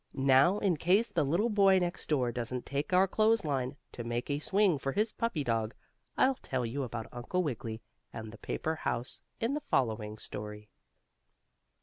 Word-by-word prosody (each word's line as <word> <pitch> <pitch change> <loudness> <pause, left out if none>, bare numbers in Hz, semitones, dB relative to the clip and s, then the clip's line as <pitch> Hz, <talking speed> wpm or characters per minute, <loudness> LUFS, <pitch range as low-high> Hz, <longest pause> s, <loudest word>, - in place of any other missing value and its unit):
Now, 135 +7 +5
in 190 -6 +1
case 195 +9 +3
the 175 -7 +1
little 175 +12 +1
boy 195 -2 +5
next 175 -1 -2
door 130 -6 +2
doesn't 120 +1 -4
take 140 +4 -3
our 185 +1 +5
clothes 220 +1 +2
line, 135 -2 -1 0.2
to 120 - -6
make 120 +4 -2
a 145 - 0
swing 190 -1 +2
for 135 - -2
his 215 +1 +1
puppy 230 -11 -1
dog, 115 -2 -1 0.4
I'll 265 +1 +5
tell 130 -2 -2
you 125 +5 -3
about 120 -3 -4
Uncle 125 +10 -2
Wiggily 115 -6 -4 0.3
and 110 -1 -7
the 115 - -12
paper 160 - -2
house 120 -4 -2 0.2
in 235 +3 0
the 300 - -2
following 110 - 0
story. 105 0 -8
140 Hz, 180 wpm, -31 LUFS, 120-190 Hz, 0.4 s, Now